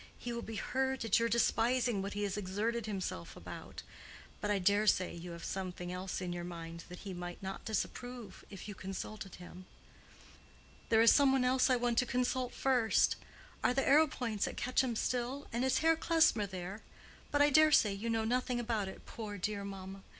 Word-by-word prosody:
"He 240 Hz, -, -5 dB
will 235 Hz, -, -3 dB
be 225 Hz, -, -7 dB
hurt 265 Hz, +2 st, -1 dB
at 225 Hz, 0 st, +4 dB
your 230 Hz, 0 st, +1 dB
despising 235 Hz, -1 st, +2 dB
what 200 Hz, +1 st, -4 dB
he 205 Hz, -, -2 dB
has 200 Hz, -2 st, -1 dB
exerted 210 Hz, +4 st, -2 dB
himself 190 Hz, -, -4 dB
about. -, -, -9 dB, 0.6 s
But 210 Hz, -, -2 dB
I 205 Hz, -, +3 dB
dare 205 Hz, +3 st, +3 dB
say 185 Hz, -3 st, +3 dB
you 170 Hz, +1 st, -8 dB
have 170 Hz, -, -9 dB
something 180 Hz, -2 st, -4 dB
else 185 Hz, +1 st, -4 dB
in 180 Hz, -1 st, -3 dB
your 175 Hz, 0 st, -4 dB
mind 170 Hz, -1 st, -7 dB
that 180 Hz, -, -9 dB
he 195 Hz, -, -6 dB
might 175 Hz, +1 st, -7 dB
not 190 Hz, 0 st, -5 dB
disapprove, 235 Hz, 0 st, -4 dB
if 195 Hz, -1 st, -9 dB
you 205 Hz, -, -5 dB
consulted 195 Hz, +1 st, -6 dB
him." 180 Hz, +1 st, -11 dB, 1.2 s
"There 225 Hz, 0 st, +5 dB
is 230 Hz, -, +8 dB
some 280 Hz, -2 st, +5 dB
one 265 Hz, -1 st, +2 dB
else 255 Hz, +1 st, +3 dB
I 255 Hz, -, +5 dB
want 240 Hz, -1 st, +1 dB
to 250 Hz, -, +1 dB
consult 250 Hz, 0 st, 0 dB
first. 250 Hz, -5 st, +3 dB, 0.5 s
Are 250 Hz, -, +3 dB
the 270 Hz, -, +2 dB
Arrowpoints 270 Hz, -8 st, +3 dB
at -, -, -6 dB
Quetcham 255 Hz, -1 st, +1 dB
still, 250 Hz, +5 st, -1 dB
and 240 Hz, +2 st, 0 dB
is 265 Hz, -, +2 dB
Herr 325 Hz, 0 st, +6 dB
Klesmer 320 Hz, -10 st, +3 dB
there? 190 Hz, +2 st, -6 dB, 0.5 s
But 290 Hz, 0 st, +4 dB
I 290 Hz, -, +4 dB
daresay 305 Hz, -8 st, +6 dB
you 210 Hz, +4 st, -4 dB
know 225 Hz, -1 st, +1 dB
nothing 250 Hz, +1 st, 0 dB
about 225 Hz, -4 st, -1 dB
it, 190 Hz, -, -9 dB
poor, 210 Hz, -3 st, -6 dB
dear 200 Hz, +1 st, -2 dB
mamma. 195 Hz, 0 st, -7 dB
220 Hz, 195 wpm, -34 LUFS, 190-250 Hz, 1.2 s, is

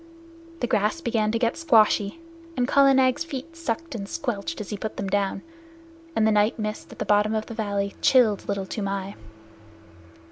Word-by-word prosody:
The -, -, +2 dB
grass 210 Hz, +5 st, +1 dB
began 225 Hz, -7 st, 0 dB
to 230 Hz, -, 0 dB
get 230 Hz, 0 st, 0 dB
squashy, 225 Hz, -5 st, +3 dB, 0.4 s
and 245 Hz, -1 st, +1 dB
Kala 275 Hz, 0 st, +5 dB
Nag's 260 Hz, +3 st, +3 dB
feet 330 Hz, +1 st, -7 dB
sucked 330 Hz, 0 st, -4 dB
and 200 Hz, -4 st, -6 dB
squelched 255 Hz, 0 st, -3 dB
as 210 Hz, -, -6 dB
he -, -, -2 dB
put 215 Hz, +2 st, -5 dB
them 200 Hz, -, -3 dB
down, 195 Hz, 0 st, -1 dB, 0.7 s
and 220 Hz, -, +3 dB
the 220 Hz, -, +4 dB
night 210 Hz, +1 st, +2 dB
mist 215 Hz, -1 st, -5 dB
at -, -, -12 dB
the -, -, -3 dB
bottom 210 Hz, +1 st, +3 dB
of 215 Hz, 0 st, -1 dB
the -, -, -8 dB
valley 200 Hz, -3 st, -2 dB
chilled 225 Hz, -7 st, +3 dB
Little 200 Hz, -1 st, -1 dB
Toomai. 195 Hz, -1 st, -3 dB
220 Hz, 180 wpm, -25 LUFS, 205-255 Hz, 0.7 s, Kala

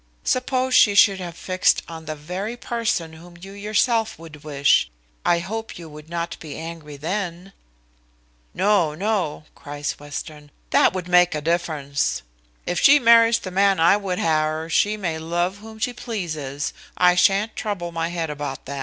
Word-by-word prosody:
Suppose 255 Hz, 0 st, 0 dB
she 205 Hz, -4 st, +6 dB
should 195 Hz, -1 st, +6 dB
have 170 Hz, -2 st, -7 dB
fixed 185 Hz, 0 st, +1 dB
on 160 Hz, -1 st, -9 dB
the 155 Hz, 0 st, -4 dB
very 185 Hz, +10 st, -5 dB
person 225 Hz, -10 st, -2 dB
whom 175 Hz, +2 st, -14 dB
you 195 Hz, +2 st, -10 dB
yourself 215 Hz, +3 st, 0 dB
would 155 Hz, -2 st, -12 dB
wish, 140 Hz, -, +2 dB, 0.3 s
I 175 Hz, -, +3 dB
hope 220 Hz, +6 st, -5 dB
you 170 Hz, -2 st, -9 dB
would 150 Hz, 0 st, -12 dB
not 170 Hz, 0 st, -4 dB
be 150 Hz, -3 st, -8 dB
angry 160 Hz, -3 st, -8 dB
then?" 180 Hz, +3 st, -4 dB, 1.0 s
"No, 190 Hz, -7 st, +2 dB
no," 190 Hz, -5 st, -1 dB
cries 145 Hz, 0 st, -5 dB
Western, 145 Hz, +1 st, -8 dB, 0.2 s
"that -, -, +4 dB
would 185 Hz, -2 st, -4 dB
make 180 Hz, -2 st, +4 dB
a -, -, -1 dB
difference. 145 Hz, -, -1 dB, 0.4 s
If 175 Hz, -, -1 dB
she 285 Hz, +1 st, +7 dB
marries 230 Hz, -2 st, +6 dB
the 185 Hz, -, -7 dB
man 195 Hz, 0 st, +3 dB
I 165 Hz, +4 st, +6 dB
would 195 Hz, -3 st, -3 dB
ha' -, -, -2 dB, 0.2 s
her, 155 Hz, +1 st, -2 dB
she 210 Hz, +6 st, +2 dB
may 170 Hz, -6 st, -3 dB
love 175 Hz, +4 st, -1 dB
whom 220 Hz, +1 st, -12 dB
she 235 Hz, +3 st, -2 dB
pleases, 155 Hz, -, -4 dB, 0.2 s
I 180 Hz, 0 st, +5 dB
shan't 195 Hz, +4 st, +2 dB
trouble 185 Hz, -5 st, -4 dB
my 165 Hz, 0 st, -2 dB
head 165 Hz, -3 st, -3 dB
about 145 Hz, -2 st, -6 dB
that." 140 Hz, +1 st, -5 dB
175 Hz, 170 wpm, -22 LUFS, 155-205 Hz, 1.0 s, she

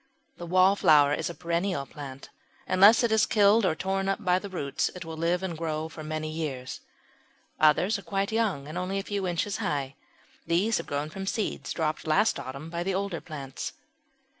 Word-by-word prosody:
The 175 Hz, -, -7 dB
Wallflower 170 Hz, -6 st, +5 dB
is -, -, -2 dB
a 170 Hz, -, -7 dB
perennial 170 Hz, -2 st, -1 dB
plant; 135 Hz, -2 st, -10 dB, 0.4 s
unless 200 Hz, +6 st, +6 dB
it 235 Hz, -, +2 dB
is 220 Hz, -1 st, +4 dB
killed 210 Hz, 0 st, +4 dB
or 160 Hz, -, +1 dB
torn 195 Hz, +2 st, -1 dB
up 195 Hz, +1 st, -2 dB
by 180 Hz, 0 st, +3 dB
the 200 Hz, -, -8 dB
roots 145 Hz, -6 st, -1 dB
it 180 Hz, -2 st, -7 dB
will 160 Hz, 0 st, -6 dB
live 170 Hz, +3 st, 0 dB
and 180 Hz, -3 st, -3 dB
grow 160 Hz, -1 st, -3 dB
for 155 Hz, -, -9 dB
many 155 Hz, 0 st, -4 dB
years. 140 Hz, -5 st, -5 dB, 0.8 s
Others 180 Hz, +7 st, +4 dB
are -, -, -9 dB
quite 195 Hz, 0 st, -2 dB
young 210 Hz, -11 st, 0 dB
and 155 Hz, +4 st, -4 dB
only 185 Hz, +2 st, -2 dB
a 195 Hz, -, -2 dB
few 200 Hz, -2 st, -2 dB
inches 180 Hz, +3 st, -1 dB
high. 140 Hz, -2 st, -2 dB, 0.5 s
These 190 Hz, +7 st, +2 dB
have -, -, -7 dB
grown 145 Hz, +2 st, -3 dB
from 195 Hz, +3 st, -6 dB
seeds 215 Hz, +2 st, -2 dB
dropped 155 Hz, -1 st, -2 dB
last 195 Hz, +6 st, +3 dB
autumn 140 Hz, +4 st, -7 dB
by 170 Hz, 0 st, -3 dB
the 185 Hz, +1 st, -1 dB
older 195 Hz, -3 st, -2 dB
plants. 140 Hz, -4 st, -6 dB
175 Hz, 190 wpm, -27 LUFS, 155-195 Hz, 0.8 s, unless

